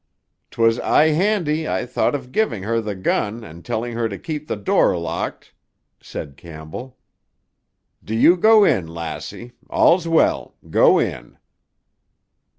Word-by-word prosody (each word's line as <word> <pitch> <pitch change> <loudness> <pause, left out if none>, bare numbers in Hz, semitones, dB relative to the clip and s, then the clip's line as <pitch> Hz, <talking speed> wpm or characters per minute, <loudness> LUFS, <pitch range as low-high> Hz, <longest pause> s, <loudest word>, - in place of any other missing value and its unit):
"'Twas 115 0 +2
aye 155 - +3
handy 160 -2 0
I - - -1
thought 125 +3 0
of 130 -3 -7
giving 170 - -1
her 115 +2 0
the 105 -2 -5
gun 105 +4 -2
and 85 -2 -12
telling 120 +2 -3
her 115 -1 -1
to 100 - -6
keep 155 -3 -6
the - - -2
door 100 -3 +2
locked," 85 0 -5 0.5
said 70 -3 -8
Campbell. 85 +12 -10 1.1
"Do 110 - -4
you 170 +10 +6
go 215 +3 +5
in, 90 - +2
lassie. 85 +7 -7 0.2
All's 170 0 +3
well. 165 -1 +1
Go - - +4
in." - - -3
115 Hz, 140 wpm, -21 LUFS, 95-155 Hz, 1.1 s, you